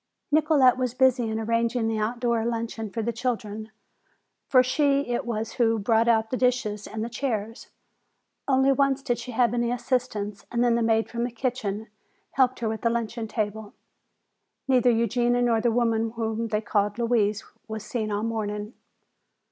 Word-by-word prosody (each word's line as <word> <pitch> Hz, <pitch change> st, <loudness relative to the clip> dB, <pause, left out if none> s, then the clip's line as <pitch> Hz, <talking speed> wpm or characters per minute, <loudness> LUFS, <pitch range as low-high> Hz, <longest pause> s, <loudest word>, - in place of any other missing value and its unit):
Nicolete 295 Hz, -5 st, +4 dB
was 255 Hz, -1 st, -2 dB
busy 255 Hz, -3 st, +3 dB
in 220 Hz, 0 st, -2 dB
arranging 230 Hz, +1 st, 0 dB
the 220 Hz, -1 st, -1 dB
outdoor 235 Hz, +1 st, 0 dB
luncheon 230 Hz, -1 st, -3 dB
for 225 Hz, +2 st, -3 dB
the 235 Hz, +2 st, -1 dB
children. 220 Hz, -3 st, -3 dB, 0.8 s
For 255 Hz, -1 st, +6 dB
she 280 Hz, +2 st, +1 dB
it 240 Hz, -1 st, -2 dB
was 225 Hz, -1 st, -2 dB
who 230 Hz, -3 st, +2 dB
brought 225 Hz, +2 st, +2 dB
out 225 Hz, -1 st, +2 dB
the 255 Hz, -, 0 dB
dishes 240 Hz, -5 st, 0 dB
and 220 Hz, 0 st, -4 dB
the -, -, -3 dB
chairs. 225 Hz, -3 st, -4 dB, 0.8 s
Only 265 Hz, 0 st, +4 dB
once 275 Hz, 0 st, +1 dB
did 240 Hz, -3 st, -1 dB
she -, -, -8 dB
have 240 Hz, 0 st, +2 dB
any 240 Hz, 0 st, 0 dB
assistance 215 Hz, -5 st, -2 dB
and 240 Hz, 0 st, +1 dB
then 240 Hz, -1 st, +3 dB
the 235 Hz, -, +1 dB
maid 225 Hz, -1 st, +2 dB
from 235 Hz, 0 st, -3 dB
the 245 Hz, -, -1 dB
kitchen 225 Hz, -3 st, -3 dB, 0.4 s
helped 260 Hz, -2 st, +2 dB
her 230 Hz, -, 0 dB
with 220 Hz, -1 st, -4 dB
the 230 Hz, -, +2 dB
luncheon 230 Hz, 0 st, -2 dB
table. 215 Hz, -1 st, -4 dB, 0.9 s
Neither 255 Hz, -2 st, +4 dB
Eugenia 240 Hz, +1 st, +2 dB
nor 230 Hz, -2 st, +2 dB
the 240 Hz, -, +2 dB
woman 225 Hz, -1 st, +1 dB
whom 225 Hz, 0 st, -2 dB
they 215 Hz, -1 st, -1 dB
called 205 Hz, -1 st, 0 dB
"Louise" 225 Hz, -3 st, +1 dB, 0.2 s
was 220 Hz, -1 st, -6 dB
seen 215 Hz, -1 st, -3 dB
all 205 Hz, +1 st, -1 dB
morning. 210 Hz, -1 st, -3 dB
230 Hz, 170 wpm, -26 LUFS, 220-245 Hz, 0.9 s, For